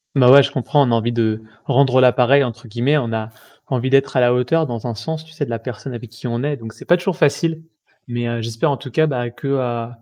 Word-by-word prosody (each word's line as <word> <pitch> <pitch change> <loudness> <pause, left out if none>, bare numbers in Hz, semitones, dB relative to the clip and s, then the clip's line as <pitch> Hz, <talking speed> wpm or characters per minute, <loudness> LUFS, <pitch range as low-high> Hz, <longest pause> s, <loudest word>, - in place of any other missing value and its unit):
Bah, 125 -2 +6
ouais 140 +1 +9
je - - -2
comprends, 140 0 +1
on - - 0
a - - +3
envie 115 +1 0
de 110 -2 0 0.2
«rendre 130 -1 +3
la 125 - +6
pareille» 135 +3 +4
entre 120 -1 -6
guillemets, 125 +7 +1
on 115 -5 -2
a 110 0 -3 0.4
envie 130 0 -1
d'être 135 0 +2
à - - +4
la 120 0 +4
hauteur 140 +6 +1
dans 120 -2 -5
un 115 - -4
sens, 160 +7 -5
tu 160 - -18
sais, 150 -2 -3
de - - -11
la 115 -1 -3
personne 125 +2 -7
avec 120 -1 -8
qui 115 +2 -8
on 120 +2 -2
est, 145 -1 -1
donc 115 -1 -9
c'est - - -14
pas 175 - +4
toujours 180 0 -3
facile. 160 +2 +1 0.4
Mais 120 0 -3
heu, 115 -1 -3
j'espère 115 +7 -1
en 140 - -1
tout 135 - -9
cas 155 +6 +2
bah, 125 -5 -2
que, 135 +4 -8
heu, 120 -4 -1
125 Hz, 275 wpm, -19 LUFS, 115-140 Hz, 0.4 s, ouais